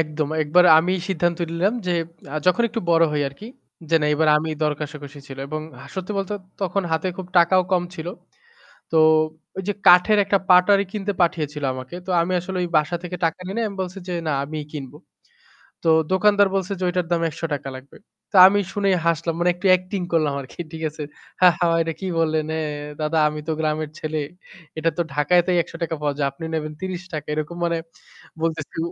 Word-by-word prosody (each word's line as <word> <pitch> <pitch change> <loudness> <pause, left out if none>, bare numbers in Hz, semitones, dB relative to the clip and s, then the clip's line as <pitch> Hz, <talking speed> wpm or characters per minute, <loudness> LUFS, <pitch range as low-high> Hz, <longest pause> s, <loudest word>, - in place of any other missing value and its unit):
একদম, 155 -1 -1
একবার 165 +4 +4
আমি 175 +3 +1 0.2
সিদ্ধান্ত 175 -2 0
নিলাম 175 +5 +1
যে 180 - +1 0.4
আ - - -1
যখন 185 +6 +4
একটু 230 0 -3
বড় 165 0 +5
হই 150 -1 0
আরকি, 140 +11 -12 0.4
যে - - +3
না - - +2
এবার 155 +1 +2
আমি 160 +1 -3
দরকষাকষি 150 -1 -4
ছিল 135 0 -9
এবং 155 +1 -3 0.3
সত্যি 190 +1 -4
বলতে 195 +1 -3 0.3
তখন 195 +1 0
হাতে 160 +3 0
খুব 190 - -6
টাকাও 185 +2 +5
কম 180 -1 +3
ছিল। 160 -2 -7 0.9
তো 160 - +4 0.6
ওই 190 - -3
যে - - +2
কাঠের 180 +4 +7
একটা 200 0 +2
পাটারি 195 +2 +6
কিনতে 205 -1 -2
পাঠিয়েছিল 150 -3 -1
আমাকে। 130 +6 -8
তো - - -4
আমি 170 +2 0
আসলে 185 +2 -6
ওই 175 - -2
বাসা 155 +3 +2
থেকে 180 0 -5
টাকা 165 +2 0
নেই 190 - -5
নাই, 230 - 0
আমি 200 - -9
বলছি 185 +1 -6
যে - - -2
না 155 - +1
আমিই 150 +1 -5
কিনব। 140 -4 -7 0.9
তো - - 0 0.2
দোকানদার 200 +1 +4
বলছে 195 0 -1
যে - - -7
ওইটার 180 -1 -1
দাম 170 - +2
৳১০০ 150 -3 -4
লাগবে। 130 +2 -14 0.4
তো - - +1
আমি 205 +2 +4
শুনেই 200 -2 +2
হাসলাম। 165 0 +1
মানে 175 +1 +3
একটু 180 +2 -5
অ্যাক্টিং 185 +2 0
করলাম 155 -4 +2
আরকি 135 +5 -11
ঠিক 160 0 -7
আছে? 150 +1 -8 0.4
"হা, 185 - +8
হা, 175 - +2 0.2
এটা 165 0 -3
কি 190 - -4
বললেন 155 -1 +1
এ - - -1 0.4
দাদা 155 +1 0
আমি 150 0 -5
তো - - +1
গ্রামের 155 -1 -1
ছেলে। 155 0 -3 0.6
এটা 165 +1 +1
তো - - +3
ঢাকায়তেই 175 +4 +3
৳১০০ 165 0 -5
পাওয়া 145 -1 -1
যায়। 140 -2 +1
আপনি 140 - -9
নেবেন 155 -1 -3
৳৩০।" 185 -4 -5
এরকম 155 +3 -4
মানে 170 -1 0 0.6
বলতেছি। 160 -3 -3
165 Hz, 195 wpm, -22 LUFS, 155-185 Hz, 0.9 s, হা